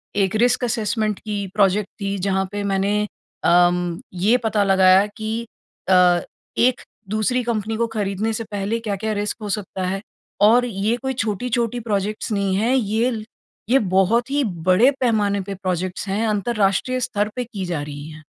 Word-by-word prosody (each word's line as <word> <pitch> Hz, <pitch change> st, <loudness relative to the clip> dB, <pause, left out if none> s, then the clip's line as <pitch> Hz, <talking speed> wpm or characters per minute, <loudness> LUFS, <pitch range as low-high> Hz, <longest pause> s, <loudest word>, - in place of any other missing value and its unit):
एक 195 Hz, 0 st, +1 dB
risk 245 Hz, +3 st, +2 dB
assessment 220 Hz, -3 st, -1 dB
की 205 Hz, -2 st, -4 dB
project 200 Hz, 0 st, +2 dB
थी 200 Hz, 0 st, -1 dB
जहाँ 190 Hz, -1 st, +1 dB
पे 205 Hz, 0 st, -3 dB
मैंने 195 Hz, 0 st, 0 dB, 0.6 s
अम 175 Hz, 0 st, +3 dB
ये 205 Hz, +7 st, +3 dB
पता 215 Hz, -2 st, +2 dB
लगाया 190 Hz, 0 st, +5 dB
कि 220 Hz, 0 st, -3 dB, 0.6 s
अ, 180 Hz, -1 st, +5 dB, 0.4 s
एक 250 Hz, +1 st, +3 dB, 0.3 s
दूसरी 220 Hz, +4 st, 0 dB
कंपनी 225 Hz, -2 st, -2 dB
को 235 Hz, 0 st, +1 dB
खरीदने 205 Hz, +2 st, -1 dB
से 225 Hz, -, -3 dB
पहले 205 Hz, +3 st, -1 dB
क्या-क्या 215 Hz, -1 st, -2 dB
रिस्क 205 Hz, 0 st, -2 dB
हो 210 Hz, -, -5 dB
सकता 190 Hz, -2 st, -6 dB
है? 195 Hz, +1 st, -2 dB, 0.4 s
और 235 Hz, +4 st, +6 dB
ये 215 Hz, +1 st, -1 dB
कोई 265 Hz, +1 st, -3 dB
छोटी-छोटी 235 Hz, +1 st, -1 dB
प्रोजेक्ट्स 215 Hz, 0 st, -2 dB
नहीं 200 Hz, -2 st, 0 dB
है 230 Hz, +6 st, +2 dB
ये 225 Hz, +2 st, +1 dB
ल 215 Hz, -2 st, -5 dB, 0.4 s
ये 265 Hz, +3 st, +5 dB
बहुत 220 Hz, +7 st, +3 dB
ही 285 Hz, 0 st, +2 dB, 0.2 s
बड़े 210 Hz, +9 st, +6 dB
पैमाने 210 Hz, -5 st, +1 dB
पे 200 Hz, -, -3 dB
प्रोजेक्ट्स 185 Hz, 0 st, -3 dB
हैं 205 Hz, +4 st, 0 dB
अंतरराष्ट्रीय 210 Hz, +3 st, +1 dB
स्तर 215 Hz, -5 st, -1 dB
पे 250 Hz, -, -1 dB
की 210 Hz, -6 st, -6 dB
जा 165 Hz, -4 st, -2 dB
रही 145 Hz, 0 st, -7 dB
है। 155 Hz, 0 st, -11 dB
210 Hz, 165 wpm, -21 LUFS, 195-230 Hz, 0.6 s, और